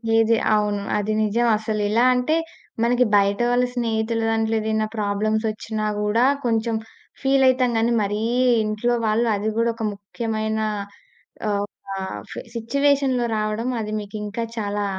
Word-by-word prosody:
ఏది? 225 0 +4 0.2
అవును. 205 -1 0 0.2
అది 210 +1 -1
నిజం. 235 +3 +1
అసలు 215 -1 -2
ఎలా 230 +3 +3
అంటే, 250 +6 +1 0.5
మనకి 245 +1 +3
బయట 200 +1 +3
వాళ్ళ 250 +1 +3
స్నేహితుల 225 -1 0
దాంట్లో 225 0 +1
ఏదైనా 220 0 0
ప్రాబ్లమ్స్ 215 +2 0
వచ్చినా 215 0 -4
గూడా, 210 +4 +2 0.2
కొంచెం 225 0 +1 0.5
ఫీల్ 270 0 +3
అయితం 255 -1 +2
గనీ, 230 +1 +2
మరీ 205 +2 -2 0.4
ఇంట్లో 215 +3 0
వాళ్ళు 230 +2 +2
అది 210 +2 -1
గూడా 230 0 +2
ఒక 225 -1 -3
ముఖ్యమైన, 220 +1 -3 0.9
ఆహ్, 200 -1 +1
ఒక 205 - -29 0.4
ఫే - - -6
సిట్యుయేషన్‌లో 270 +1 +1
రావడం, 215 +3 -1
అది 215 0 -4
మీకు 205 +1 -8
ఇంకా 230 +3 -3
చాలా 205 -1 -2
220 Hz, 145 wpm, -22 LUFS, 210-235 Hz, 0.9 s, ఏది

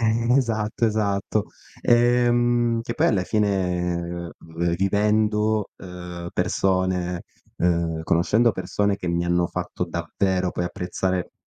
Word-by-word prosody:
Eh, 115 +1 +2
esatto, 115 -3 0
esatto. 105 -1 0 0.4
Ehm, 120 -1 +3
che 115 - -4
poi - - +2
alla 95 -4 +1
fine 90 -4 -1
v 85 +1 -2
vivendo, 105 +2 +1
ehm, 90 -1 -8
persone, 90 -2 0 0.3
ehm, 85 -2 0
conoscendo 105 +9 +3
persone 100 +2 -1
che 90 - -5
mi 85 0 0
hanno 85 0 +2
fatto - - -3
davvero, 95 -2 -1
poi, 90 - -2
apprezzare 90 0 -2
95 Hz, 115 wpm, -24 LUFS, 90-110 Hz, 0.4 s, Ehm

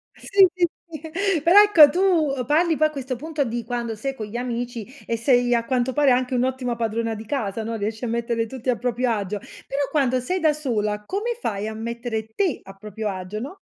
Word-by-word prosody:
sì, 390 -1 +4
sì, 360 -1 +2 0.2
sì. 330 +2 -2
Però 350 +5 +7
ecco, 335 -8 +8
tu 340 -4 +2
parli 320 +2 +3
poi 310 - +4
a - - -9
questo 265 -3 -4
punto 305 +2 -2
di 235 -2 -3
quando 235 -2 -3
sei 270 +5 -4
con 220 - -5
gli 225 +3 -6
amici 240 -2 -4 0.2
e 230 - -1
sei 245 0 +3
a 235 -1 +1
quanto 255 0 0
pare 290 -1 +4
anche 255 +1 +1
un'ottima 250 -1 0
padrona 230 0 -1
di 220 - -8
casa, 225 -4 -2
no, 225 +1 -3
riesci 220 +2 -3
a - - -2
mettere 230 0 -1
tutti 255 +1 -5
a 240 - +2
proprio 245 +1 0
agio, 205 -2 -2 0.3
però 280 +1 -1
quando 255 -4 +2
sei 365 +9 -1
da 315 -3 +3
sola 215 -8 -2
come 440 - -2
fai 210 - -3
a 220 - -4
mettere 230 0 -4
te 370 -8 0
a 195 - -11
proprio 210 +2 -5
agio, 190 +2 -5
no? 295 +10 -7
245 Hz, 215 wpm, -23 LUFS, 225-300 Hz, 0.3 s, ecco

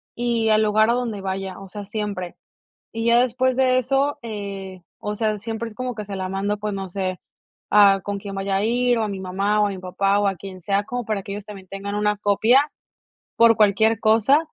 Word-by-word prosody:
y 235 -2 0
al 215 0 +4
lugar 215 +1 +3
a - - +3
donde 235 -5 -2
vaya, 190 0 -4
o 195 - -10
sea, 205 +1 -8
siempre. 205 -4 -4 0.6
Y 225 0 -4
ya 235 +1 +5
después 255 +1 +1
de 255 -1 +3
eso, 270 +3 +1
eh, 200 -4 -6 0.2
o 210 0 -4
sea, 215 -1 -1
siempre 225 +1 -4
es 215 - -16
como 255 0 -4
que 210 - -5
se 200 -1 -6
la 185 0 -3
mando, 195 +2 -2
pues, 210 0 -3
no 195 -1 -5
sé, 185 0 -3 0.5
a 200 -1 +6
con 205 0 -3
quién 195 -1 -7
vaya 195 0 -1
a 200 - 0
ir, 245 +1 +2
o 225 - 0
a - - -1
mi 195 -2 -5
mamá, 200 +3 0
o 210 - +3
a - - -2
mi 195 - -5
papá, 195 +2 +1
o 205 - +2
a 195 - 0
quien 185 +1 -9
sea. 200 +3 0
Como 245 +2 -4
para 210 -3 -2
que 200 - -8
ellos, 200 0 -6
también 195 -3 -11
tengan 200 +1 -5
una 210 0 +1
copia, 210 +5 +4 0.8
por 230 -1 +5
cualquier 220 +1 +3
cosa. 225 +6 +4
210 Hz, 230 wpm, -22 LUFS, 195-225 Hz, 0.8 s, a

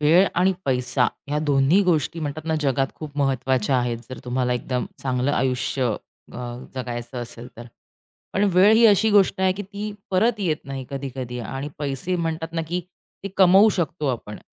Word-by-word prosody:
वेळ 165 +6 +5
आणि 185 +2 +3
पैसा 125 -1 +1 0.2
ह्या 150 +1 0
दोन्ही 145 +4 +3
गोष्टी 165 -2 0
म्हणतात 155 +1 -4
ना, 160 - +1
जगात 135 -2 +1
खूप 150 -2 -9
महत्त्वाच्या 130 -2 +1
आहेत. 120 -1 -1
जर 130 - -6
तुम्हाला 125 0 0
एकदम 125 0 -2 0.2
चांगलं 130 0 0
आयुष्य 130 -2 0 0.4
अ, - - -9 0.4
जगायचं 120 -1 -5
असेल 120 0 -7
तर. 120 +1 -9 0.7
पण 200 +2 +2
वेळ 190 +4 +7
ही 230 +1 +5
अशी 215 +1 +4
गोष्ट 200 -1 +4
आहे, 190 -1 +3
की 205 - -6
ती 205 +2 -6 0.2
परत 210 +4 +2
येत 165 -6 +1
नाही 135 -1 -5
कधी-कधी 130 -3 -5
आणि 135 +5 -5
पैसे 145 +5 -2
म्हणतात 165 -1 -3
ना 165 - 0
की 180 +1 -1 0.4
ते - - -2
कमवू 195 +3 +7
शकतो 160 -3 -2
आपण 115 -5 -3
140 Hz, 175 wpm, -23 LUFS, 125-180 Hz, 0.7 s, वेळ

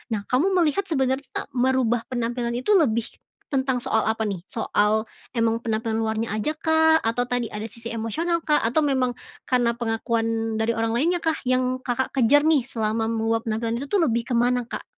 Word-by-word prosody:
Nah 200 - -4
kamu 260 - +1
melihat 345 +2 +2
sebenarnya 265 -3 -1
merubah 250 -2 +1
penampilan 240 -1 -2
itu 255 +12 -1
lebih 235 - +3 0.4
tentang 265 -3 0
soal 220 - 0
apa 220 0 0
nih? 185 -2 -5
Soal 215 0 0 0.2
emang 230 -1 +1
penampilan 225 -1 -2
luarnya 220 0 -1
ajakah? 320 +4 +2
Atau 235 +2 0
tadi 245 -2 -2
ada 210 +1 -5
sisi 230 +1 -8
emosional, 320 +10 -2
Kak? 300 -1 +3
Atau 255 +7 +1
memang 255 -3 0 0.3
karena 240 -2 +2
pengakuan 225 -1 -1
dari 225 - 0
orang 225 0 0
lainnyakah 325 +5 +1 0.2
yang 255 0 +1
Kakak 255 +1 -2
kejar 280 +4 +4
nih 310 -4 +4
selama 225 -2 -2
meluap 225 0 -1
penampilan 230 +2 -2
itu 280 - -7
tuh 380 -5 +3
lebih 235 -2 +1
ke 240 - +1
mana, 245 0 +1
Kak? - - -5
240 Hz, 170 wpm, -24 LUFS, 225-265 Hz, 0.4 s, kejar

